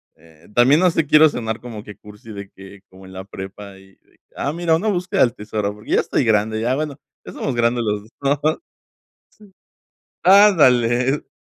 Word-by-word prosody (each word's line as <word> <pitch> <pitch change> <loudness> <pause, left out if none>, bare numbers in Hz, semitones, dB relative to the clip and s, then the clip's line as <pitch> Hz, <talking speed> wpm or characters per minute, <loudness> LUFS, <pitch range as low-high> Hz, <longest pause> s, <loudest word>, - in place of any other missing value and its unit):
eh, 80 -1 -22
también 130 +5 +5
no 185 - +4
sé, 165 -2 0
quiero 155 +1 +6
cenar 115 -4 -5
como 115 -4 -9
que 105 -2 -12
cursi 105 +1 -14
de 100 -1 -9
que 95 0 -14
como 95 0 -16
en 95 - -13
la 95 0 -8
prepa 100 0 -10
y 95 0 -21
de - - -33
que: - - -38
"Ah, 140 - -2
mira, 170 -1 +1
una 195 +7 -2
búsqueda 180 -2 -1
del 120 -3 +3
tesoro", 105 -1 -4
porque 105 +2 -12
ya - - +3
estoy - - -1
grande, 110 0 +1
ya 120 +3 0
bueno, 150 -1 -4 0.3
ya - - -9
somos 135 - -3
grandes 120 0 +1
los 105 -2 -2
2, 110 - -19 0.3
¿no?, 155 - +3
sí. - - -35 1.6
¡Ándale! 135 - +4
115 Hz, 200 wpm, -20 LUFS, 105-145 Hz, 1.6 s, quiero